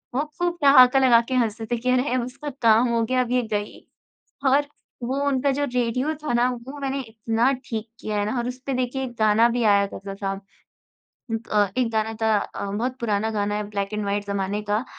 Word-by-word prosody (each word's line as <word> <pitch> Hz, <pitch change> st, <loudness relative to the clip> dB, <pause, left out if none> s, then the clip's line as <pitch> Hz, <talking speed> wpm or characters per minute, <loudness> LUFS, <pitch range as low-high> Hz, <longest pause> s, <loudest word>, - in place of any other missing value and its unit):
वो 280 Hz, -, +2 dB, 0.2 s
खूब 350 Hz, 0 st, 0 dB
ठहाका 270 Hz, -1 st, +7 dB
लगाकर 250 Hz, 0 st, +4 dB
हँसते 225 Hz, -2 st, 0 dB
थे 240 Hz, -, +1 dB
कि, 250 Hz, +2 st, -2 dB
"अरे 255 Hz, 0 st, +1 dB
उसका 275 Hz, +4 st, -7 dB
काम 230 Hz, +2 st, +5 dB
हो 235 Hz, 0 st, +1 dB
गया 255 Hz, +3 st, +1 dB
अब 245 Hz, -1 st, -3 dB
ये 250 Hz, 0 st, +3 dB
गई।" 205 Hz, 0 st, -4 dB, 0.6 s
और 285 Hz, +2 st, +3 dB, 0.4 s
वो 265 Hz, +4 st, -2 dB
उनका 275 Hz, 0 st, +1 dB
जो -, -, +2 dB
रेडियो 250 Hz, +5 st, 0 dB
था 270 Hz, -, -1 dB
ना 240 Hz, +1 st, +3 dB
वो 250 Hz, +4 st, -8 dB
मैंने 275 Hz, 0 st, -2 dB
इतना 225 Hz, +1 st, 0 dB
ठीक 220 Hz, -1 st, -4 dB
किया 210 Hz, -1 st, -3 dB
है 205 Hz, -, +1 dB
ना -, -, -3 dB
और 240 Hz, +1 st, -2 dB
उस 250 Hz, +1 st, -6 dB
पे 275 Hz, -, -1 dB
देखिए 265 Hz, +2 st, -3 dB
एक 245 Hz, -, -6 dB
गाना 215 Hz, +2 st, +4 dB
भी 240 Hz, 0 st, -1 dB
आया 200 Hz, -1 st, +4 dB
करता 195 Hz, 0 st, -7 dB
था। 195 Hz, -1 st, -3 dB, 1.2 s
अ, 205 Hz, -2 st, +3 dB
एक 245 Hz, -3 st, +1 dB
गाना 220 Hz, 0 st, 0 dB
था 220 Hz, -1 st, +3 dB
अ, 200 Hz, -, -5 dB
बहुत 245 Hz, +5 st, -2 dB
पुराना 220 Hz, -1 st, 0 dB
गाना 205 Hz, -1 st, -1 dB
है 210 Hz, -, -2 dB
ब्लैक 200 Hz, 0 st, -3 dB
एंड 210 Hz, -1 st, -2 dB
व्हाइट 200 Hz, 0 st, -2 dB
ज़माने 200 Hz, +1 st, -2 dB
का। 210 Hz, +4 st, -1 dB
235 Hz, 210 wpm, -24 LUFS, 210-255 Hz, 1.2 s, ठहाका